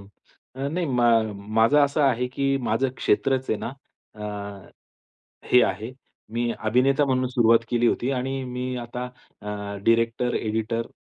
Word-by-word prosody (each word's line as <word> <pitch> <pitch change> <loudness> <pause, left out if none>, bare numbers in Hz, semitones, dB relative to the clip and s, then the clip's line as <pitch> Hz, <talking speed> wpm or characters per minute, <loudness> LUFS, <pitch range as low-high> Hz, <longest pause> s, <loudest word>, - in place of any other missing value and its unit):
हं. 100 - -15 0.6
अ, - - 0
नाही 170 +3 -2
मा 125 -4 +1 0.5
माझं 115 +6 +5
असं 140 +2 -1
आहे 125 -3 +2
की 135 +2 0
माझं 120 +3 +1
क्षेत्रच 130 -1 +1
आहे 110 - 0
ना, - - -4 0.5
अ, 100 -2 -7 0.8
हे 125 - +7
आहे. 105 +5 -2 0.4
मी 120 0 0
अभिनेता 130 +6 +2
म्हणून 130 -1 +1
सुरुवात 115 -2 +4
केली 120 0 +2
होती 120 +2 0
आणि 135 +1 -2
मी 125 0 -4
आता 125 +1 -6
अ, 125 -4 -15 0.4
डायरेक्टर, 115 +1 +2
एडिटर, 110 +1 -2
125 Hz, 145 wpm, -24 LUFS, 115-130 Hz, 0.8 s, हे